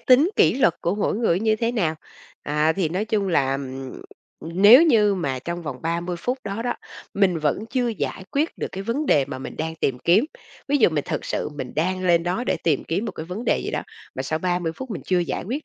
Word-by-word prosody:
tính 275 +8 +5
kỷ - - +5
luật 255 - +3
của 170 - 0
mỗi 205 0 0
người 205 -7 +2
nó - - -5
như 220 -1 +3
thế 230 +2 -1
nào. 175 -9 0 0.5
À, 150 +2 +1
thì 175 -3 0
nói 185 +6 -1
chung 210 -3 0
là, 135 -5 +2
ừm, 135 -1 -5 0.5
nếu 205 - +7
như 215 -10 +4
mà 140 -8 -2
trong 170 +5 -5
vòng 140 -5 -5
30 170 +2 -2
phút 250 +9 -2
đó 200 +3 -3
đó, 245 - -1 0.4
mình 190 -4 +2
vẫn 155 +8 0
chưa 250 -2 0
giải 200 -3 -4
quyết 300 +3 -1
được - - -3
cái 195 - -5
vấn 255 +8 -2
đề 140 -2 +4
mà 130 -1 -6
mình - - -8
đang 160 +1 -3
tìm 130 -5 -1
kiếm, 190 - +4 0.4
ví 290 - +3
dụ 235 - +5
mình 150 -2 -1
thực - - -2
sự - - -2
mình 130 -3 -5
đang 185 +3 -1
lên 170 -2 +4
đó 180 +8 -1
để - - 0
tìm 155 -4 +1
kiếm 185 +7 -2
một - - -4
cái 160 - -7
vấn 190 +7 -5
đề - - +2
gì - - -3
đó, - - -2 0.3
mà 130 - -3
sau 155 +4 -2
30 175 -2 -1
phút 265 -2 -7
mình 200 - -5
chưa 185 -1 +2
giải 170 - -2
quyết 265 +10 -4
180 Hz, 250 wpm, -23 LUFS, 160-225 Hz, 0.5 s, nếu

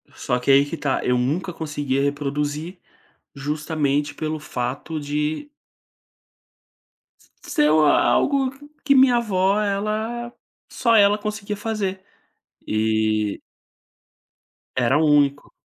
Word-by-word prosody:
Só 125 0 -1
que 130 +2 +1
aí 140 +1 +6
que 160 +3 -6
tá: 135 -2 -1
eu 125 0 +2
nunca 155 +9 -1
conseguia 145 -4 -2
reproduzir, 145 +4 -2 0.5
justamente 145 0 -1
pelo 155 0 -3
fato 140 +4 -4
de 150 - -3 1.9
se - - -13
ser 150 0 +3
o 155 -1 +4
algo 270 - +3
q 290 +2 -16
que 280 -2 +4
minha 260 -2 +6
avó 200 -2 +1
ela, 215 +4 -2 0.4
só 230 -3 +2
ela 205 0 +5
conseguia 210 -1 -4
fazer, 205 -3 -3 0.6
e 110 -1 0 1.4
era 130 +4 +3
único. 145 -2 +2
155 Hz, 110 wpm, -22 LUFS, 140-210 Hz, 1.9 s, aí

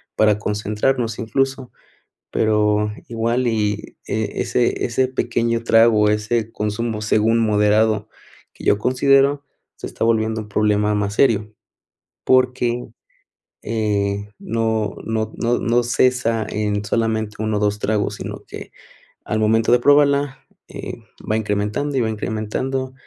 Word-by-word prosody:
para 105 -1 +3
concentrarnos 110 +3 -1
incluso, 135 +2 -1 0.6
pero, 105 -1 +2 0.2
igual 115 +2 0
y 105 -2 -1
ese 110 +2 -1
ese 130 +2 +1
pequeño 115 -2 -1
trago, 115 -2 +5
ese 110 +1 -1
consumo 105 +1 -3
según 110 +2 +2
moderado, 105 0 +2 0.4
que - - -12
yo 100 - +3
considero 135 +4 +3 0.3
se - - -7
está - - -3
volviendo 110 -1 +1
un 105 - -9
problema 105 0 +1
más 100 0 -1
serio, 110 -5 +2 0.7
porque, 125 -1 +2 0.8
eh, 105 -2 -1
no 110 -1 -1
no 110 -1 -2
no 120 +1 0
no 120 +1 +1
cesa 120 -2 +1
en 105 -1 -1
solamente, 110 0 -1
1 110 -1 -1
o - - 0
2, 105 0 0
tragos, 105 -1 -1
sino - - -7
que - - -9 0.6
al 110 - -1
momento 110 +2 +2
de 125 - +5
probarla, 140 0 +3 0.2
eh, - - -7 0.4
va 110 - +2
incrementando 105 +7 -1
y - - +2
va 110 - 0
incrementando, 120 +5 -3
110 Hz, 125 wpm, -20 LUFS, 105-120 Hz, 0.8 s, trago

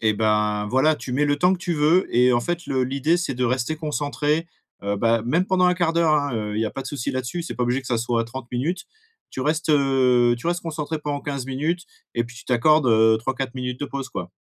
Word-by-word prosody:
Et 110 -1 +3
ben 105 -1 +1
voilà, 150 +5 +3
tu 125 - -7
mets 145 +3 +2
le 145 0 +1
temps 180 +5 +3
que - - -7
tu 175 - -2
veux, 160 +4 +3
et 125 +1 +5
en 120 - +3
fait 175 +6 -3
le 130 -2 0
l'idée 140 +6 +1
c'est 170 -7 -2
de 125 0 -1
rester 125 +4 0
concentré, 150 +1 -1 0.4
heu, 100 0 0
bah, 115 +1 +2
même 165 +9 +2
pendant 185 -1 +2
1/4 175 -2 +2
d'heure, 165 -2 +3
hein, 145 -4 0
heu, 105 -1 -3
il - - 0
y 110 - +1
a - - -4
pas 135 - -6
de - - -9
souci 140 -6 -3
là-dessus. 130 +7 -3
C'est - - -6
pas 125 - 0
obligé 125 +3 0
que 130 - -13
ça 120 -2 +1
soit 115 0 0
30 120 +1 -8
minutes. 170 - -2 0.5
Tu 130 - -6
restes, 155 +3 0
heu, 130 -4 +3
tu 125 - -7
restes 175 0 0
concentré 160 -1 -4
pendant 145 -1 -3
15 140 -3 -4
minutes 155 +7 -1 0.3
et 120 - +1
puis 120 0 -12
tu - - -12
t'accordes, 140 +4 +3
heu, 110 -1 +5
3-4 135 +2 -3
minutes 125 0 -4
de - - -1
pause, 135 -1 -5
quoi. 90 -1 -6
135 Hz, 255 wpm, -23 LUFS, 120-155 Hz, 0.5 s, et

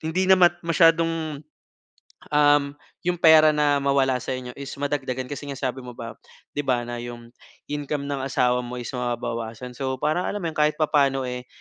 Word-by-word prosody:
hindi 160 +4 -1
naman 185 -2 +7 0.2
masyadong, 165 -2 +2 0.9
um, 145 0 +5 0.4
yung 180 - +2
pera 155 -1 +7
na 145 -1 +3
mawala 140 -2 +2
sa 130 - -4
inyo, 125 -1 -7
is 140 -1 -6
madagdagan 135 -3 -3
kasi 145 0 -6
nga 140 - -5
sabi 130 -1 -3
mo 125 - -8
ba 115 -1 -8 0.3
‘di 145 - -3
ba, 125 -2 +1
na 120 0 -5
‘yong 120 -1 -9 0.4
income 145 0 -3
ng 140 -2 -2
asawa 125 -2 +2
mo 120 +1 -6
is 120 - -6
mababawasan. 120 -1 -4
So, 130 -1 -2
para 155 +4 0
alam 205 - -3
mo 165 - -1
‘yon - - -12
kahit 150 0 +3
papaano, 140 -3 +2
eh, 125 0 -5
140 Hz, 180 wpm, -24 LUFS, 125-155 Hz, 0.9 s, naman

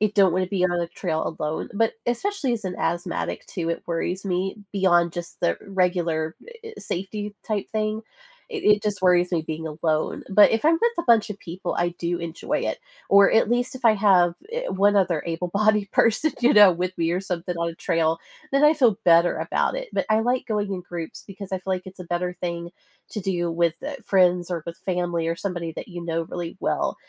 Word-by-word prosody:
you 215 -1 +2
don't 195 -3 +4
wanna 185 +1 0
be 185 -2 0
on 185 - +2
the 170 -1 -1
trail 170 -2 -2 0.2
alone; 155 +1 -3
but, 225 +2 +1
especially 270 - -1
as 225 -3 -3
an 180 -1 -3
asthmatic 170 +2 -2
too, 170 -2 -4
it 170 - -4
worries 175 +3 -2
me 190 +1 -1 0.2
beyond 175 -4 +3
just 175 0 -6
the 85 - +1
regular 175 -4 0
e 465 -1 -11
e - - -9
safety 205 +3 -4
type 210 -2 -2
thing, 215 0 -1 0.5
it 435 -4 -5
it 210 0 +5
just 210 -2 -1
worries 180 -1 +4
me 170 -3 0
being 160 0 -5
alone, 155 0 -1
but 205 +2 +6
if 225 +3 0
I'm 315 - +6
with 470 0 +3
a 340 - -1
bunch 230 -2 +4
of 205 - -6
people, 180 0 -5
I 175 0 +1
do 175 0 -3
enjoy 170 -1 -3
it, - - -6 0.3
or, 200 0 +6
at 225 - +4
least 245 +2 0
if 260 - -14
I 225 - +7
have, 190 -4 +4 0.2
eh, - - -3
one 205 +2 +3
other 175 -5 +2
able-bodied 200 +5 0
person, 230 +8 +3
you 245 +3 +5
know, 205 -3 +8
with 180 +2 -3
me, 165 0 +1
or 180 - 0
something, 180 -2 -4
on 170 0 -1
a 165 - -6
trail, 165 -1 +1 0.3
then 275 +2 +4
I 300 +1 +6
feel 240 -9 +3
better 170 0 +5
about - - 0
it, - - -5
but, - - -1
I 215 0 +4
like 245 +3 0
going 210 -3 -1
in 185 - -3
groups 175 -2 -7
because 195 -1 -10
I 190 - 0
feel, 190 +1 -3
like, 185 +1 -7
it's 185 0 -11
a - - -6
better 175 +1 -2
thing 170 -1 -4 0.4
to 210 - -4
do 175 -2 -1
with, 170 0 +1
uh, 290 - -4
friends, 180 -2 +3
or 170 -3 -2
with 170 0 -6
family, 175 -3 -1
or 165 - 0
somebody 175 -3 -4
that - - -8
you 175 -2 -7
know 165 0 -1
really 170 +1 -6
well, - - 0
185 Hz, 220 wpm, -24 LUFS, 170-210 Hz, 0.5 s, know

